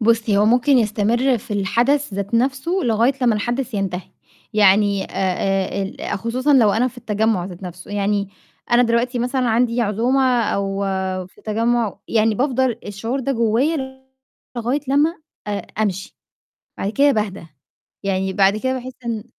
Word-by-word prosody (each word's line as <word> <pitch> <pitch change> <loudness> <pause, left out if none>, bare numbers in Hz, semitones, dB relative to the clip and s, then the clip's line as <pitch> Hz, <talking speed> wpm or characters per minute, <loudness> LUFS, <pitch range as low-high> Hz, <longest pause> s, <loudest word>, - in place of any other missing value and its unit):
بُصّي، 225 -2 +2
هو 205 - +4
ممكن 250 +5 +4
يستمر 230 +4 +1
في 215 - -16
الحدث 235 +6 +1
ذات 200 +3 -3
نَفْسه 265 +6 0
لغاية 230 +3 +2
لمّا 235 -3 +4
الحدث 240 +3 -2
ينتهي، 190 -2 -3 0.4
يعني 200 -1 +4
آآ 195 +1 -1
ال 195 0 -4
خصوصًا 255 +7 0
لو 225 -6 +5
أنا 245 +5 +2
في 250 - -13
التجمُّع 215 -4 0
ذات 180 0 -9
نَفْسه، 180 0 -9
يعني 205 -1 0 0.4
أنا 240 +1 +5
دلوقتي 240 +1 +1
مثلًا 250 +1 0
عندي 235 +1 +2
عزومة 230 +5 +1 0.2
أو 195 -1 -1 0.5
في 185 - -22
تجمُّع، 230 0 0
يعني 220 -1 +2
بافضل 255 -1 0
الشعور 225 +6 -3
ده 275 +2 -1
جوّايا 265 +3 0 0.5
لغاية 240 +5 -1
لمّا 295 +4 +3 0.3
أ - - -3 0.3
أمشي، 195 -2 -3 0.6
بعد 195 - -1
كده 280 +5 +4
باهدا، 205 -6 -3 0.6
يعني 190 -1 -1
بعد 195 +1 +3
كده 260 +4 -1
باحس 255 0 -6
إن 225 -2 -3
225 Hz, 150 wpm, -20 LUFS, 200-250 Hz, 0.6 s, لو